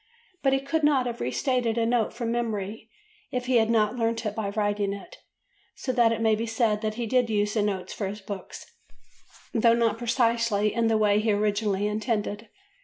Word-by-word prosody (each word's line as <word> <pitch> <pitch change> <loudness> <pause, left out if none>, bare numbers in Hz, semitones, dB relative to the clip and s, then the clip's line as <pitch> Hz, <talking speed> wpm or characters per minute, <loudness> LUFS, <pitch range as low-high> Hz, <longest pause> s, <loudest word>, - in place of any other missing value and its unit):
But 270 -1 +2
he 270 - +3
could 280 +4 -2
not 280 -4 +3
have 240 -1 -4
re 125 - -1
stated 245 - 0
a 230 - +2
note 230 -2 +1
from 235 -1 -3
memory 220 -2 -3 0.4
if 250 -1 -3
he 250 -1 +3
had 225 -1 +3
not 225 +1 +2
learnt 230 0 -1
it 210 - -1
by 210 -2 -3
writing 205 -1 0
it, 200 - -10 0.6
so 255 - -3
that 240 -2 +4
it 225 0 -1
may 220 -1 +3
be 225 +2 -1
said 220 -2 +1
that 215 -1 -2
he 235 0 -3
did 245 +1 +2
use 210 -1 0
the 220 - +1
notes 195 -3 -2
for 200 - -3
his 205 +2 -6
books, 195 -1 -8 0.9
though 230 0 +4
not 230 -1 +1
precisely 230 -3 +1
in 230 -1 +1
the 225 -1 +3
way 210 -1 +3
he 215 0 +1
originally 205 -1 0
intended. 210 0 -2
225 Hz, 205 wpm, -26 LUFS, 210-235 Hz, 0.9 s, that